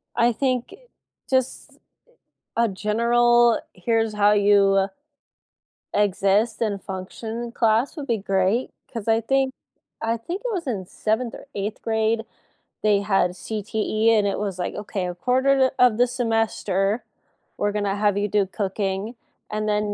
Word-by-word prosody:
I 235 +1 +4
think 255 0 -1 0.6
just 260 -1 -1 0.8
a 235 0 +3
general, 235 +3 +3
"Here's 225 +3 0
how 205 0 +4
you 200 -1 +4 1.1
exist 205 +2 +2
and 205 -4 -1
function," 220 +5 -6
class 230 +6 +1
would 290 -3 -5
be 230 -4 0
great. 195 +4 0 0.2
'Cause 230 -3 -5
I 225 0 +4
think 270 +3 +1 0.5
I 225 +1 0
think 350 - -5
it - - -1
was 355 -6 -3
in 210 -8 -2
7th 220 +5 -2
or - - -11
8th 205 +2 -4
grade 220 0 0 0.6
they 205 -2 +3
had 195 -3 +1
CTE 215 +2 0
and 210 - +2
it 200 - -1
was 200 -3 -3
like, 180 - -3
"Okay, 205 -2 -4
1/4 260 +9 +2
o 250 - +7
of 220 -3 -3
the 245 +1 +4
semester 225 -3 0 0.5
we're 205 - 0
gonna 205 -1 -1
have 205 -1 +1
you 205 0 +1
do 205 -1 +1
cooking 195 +2 -3 0.4
and 215 0 -1
then 210 0 0
215 Hz, 145 wpm, -23 LUFS, 200-235 Hz, 1.1 s, o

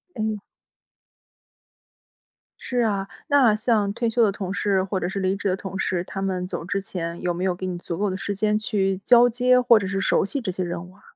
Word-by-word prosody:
哎。 215 -2 -2 2.2
是 250 - -3
啊， 200 -4 0 0.2
那 275 -8 +5
像 215 -2 +1
退 235 +1 -1
休 235 +1 +2
的 210 - +3
同 190 -1 -5
事 195 -2 +1
或 190 0 -2
者 175 - -2
是 200 0 -3
离 190 0 0
职 200 0 -2
的 185 - +1
同 190 0 -7
事， 180 -2 -1
他 190 +1 -6
们 185 -2 -1
走 180 - -5
之 195 +2 -2
前， 170 -3 -5
有 180 -1 0
没 175 +2 -4
有 185 -2 +1
给 185 - -6
你 180 -1 -3
足 175 -1 -5
够 205 +2 0
的 185 - -3
时 200 +1 -3
间 210 +1 +1
去 195 -3 0
交 240 +2 +6
接 250 +1 +3
或 240 -2 +5
者 200 - -3
是 195 +1 -2
熟 - - +2
悉 275 +7 -3
这 205 -6 -2
些 185 +1 -3
任 175 0 -4
务 180 - -16
啊？ 205 - -23
195 Hz, 245 characters per minute, -24 LUFS, 185-220 Hz, 2.2 s, 交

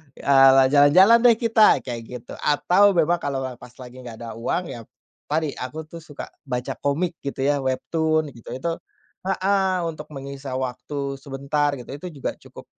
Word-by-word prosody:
eee, 135 -1 +6
jalan-jalan 180 +11 +6
deh 230 - +6
kita, 225 -2 +4
kayak 120 -2 -5
gitu. 125 -1 -9
Atau 180 +6 +3
memang 170 +1 +2
kalau 135 -2 -3 0.2
pas 125 0 -14
lagi 125 +1 -12
nggak 120 -3 -9
ada 115 - -6
uang, 175 +9 -1
ya 120 - -7 0.5
tadi 155 0 -1
aku 150 +5 -5
tuh 170 - -9
suka 155 -3 -9 0.2
baca 125 -1 -4
komik 165 +4 -1
gitu 140 -1 -4
ya, 145 +1 +2
Webtoon 155 +3 -1
gitu 115 -4 -13
itu. 130 +7 -3 0.6
Heeh, 190 -1 +1
untuk 150 -1 -8
menyisa 135 -1 -7
waktu 135 +2 -4
sebentar 140 +1 -1
gitu, 120 - -12
itu 180 - -8
juga - - -1
cukup - - -14
145 Hz, 165 wpm, -23 LUFS, 130-170 Hz, 0.6 s, eee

